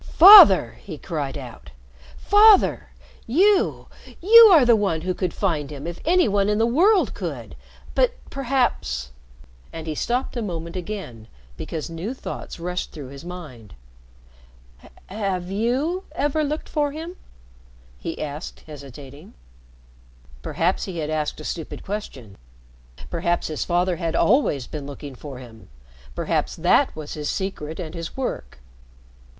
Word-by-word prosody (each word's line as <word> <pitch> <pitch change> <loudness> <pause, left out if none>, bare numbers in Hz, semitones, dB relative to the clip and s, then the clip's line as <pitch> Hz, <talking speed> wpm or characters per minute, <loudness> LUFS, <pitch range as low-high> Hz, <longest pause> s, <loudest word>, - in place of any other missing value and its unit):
"Father!" 320 - +8
he 165 -6 -9
cried 145 -5 -5
out. 120 - -10 0.5
"Father! 415 0 +4 0.4
You 380 - +2 0.3
you 455 +5 +9
are 335 - +7
the 235 -1 +5
one 195 -7 -1
who 185 +2 -2
could 180 -1 -3
find 160 -8 -2
him 145 0 -8
if 170 0 -6
any 355 -2 +3
one 200 -1 +1
in 210 - +1
the 225 - +2
world 365 - +3
could. - - -6 0.4
But - - +2 0.2
perhaps 235 - -1 0.3
" - - -26
and 160 -1 -8
he 160 - -3
stopped 245 - -2
a 240 - -2
moment 170 -5 -5
again 180 - -7 0.3
because 155 - -6
new 180 +10 -5
thoughts 255 - -8
rushed 180 +1 -4
through 145 -5 -9
his 140 +2 -11
mind. 155 - -10 1.3
"Have 190 -3 -4
you 265 - -1
ever 295 +1 0
looked 300 +1 -4
for 295 -2 -1
him?" 325 +4 -8 0.8
he 165 - -6
asked 150 +2 -7
hesitating. 140 +1 -12 1.1
Perhaps 170 - -1
he 185 -3 -7
had 155 -1 -3
asked 155 -1 -2
a - - -9
stupid 165 0 -6
question 135 - -7 0.7
perhaps 170 +1 -1
his 155 - -3
father 175 0 0
had 165 -2 -3
always 205 - +2
been 145 0 -7
looking 145 0 -9
for 135 +1 -10
him, 115 - -14 0.5
perhaps - - -2
that - - +2
was 155 -2 -7
his 150 -1 -4
secret 165 -5 -4
and 160 -3 -6
his 165 +4 -7
work. 65 - -5
175 Hz, 145 wpm, -22 LUFS, 150-245 Hz, 1.3 s, you